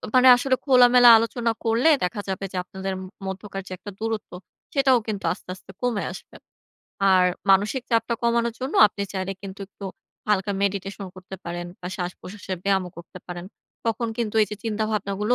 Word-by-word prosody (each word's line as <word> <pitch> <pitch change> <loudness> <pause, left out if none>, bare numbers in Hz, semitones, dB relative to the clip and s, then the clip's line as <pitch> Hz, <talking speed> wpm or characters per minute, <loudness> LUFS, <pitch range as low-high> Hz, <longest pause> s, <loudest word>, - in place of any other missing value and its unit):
মানে 255 0 +7
আসলে 260 +1 +1
খোলামেলা 250 -2 +7
আলোচনা 230 +1 0
করলে 230 +7 +3
দেখা 180 +3 -1
যাবে 195 +1 -3
যে 185 - -5
আপনাদের 190 +1 -5
ম - - -7 0.2
মধ্যকার 195 +1 -5
যে - - -11
একটা 205 +3 -9
দূরত্ব, 225 -1 -3 0.4
সেটাও 270 -3 +4
কিন্তু 205 -3 -3
আস্তে, 180 - -16
আস্তে 190 - -14
কমে 245 -4 0
আসবে। - - -11 0.8
আর 185 -1 +5 0.3
মানসিক 205 +7 +3
চাপটা 230 0 +2
কমানোর 235 0 +1
জন্য 260 +3 -4
আপনি 200 0 -5
চাইলে 190 0 -2
কিন্তু 195 0 -8
একটু 200 - -12 0.4
হালকা 205 -1 +1
মেডিটেশন 195 0 -2
করতে 185 +1 -9
পারেন 175 0 -4
বা 180 - -6
শ্বাস-প্রশ্বাসে 185 +2 -5
ব্যায়ামও 190 -2 +1
করতে 170 - -11
পারেন। 175 -1 -6 0.4
তখন 230 +1 0
কিন্তু 225 -3 -2
এইযে 210 0 -2
চিন্তাভাবনাগুলো 215 0 -1
205 Hz, 165 wpm, -24 LUFS, 190-235 Hz, 0.8 s, মানে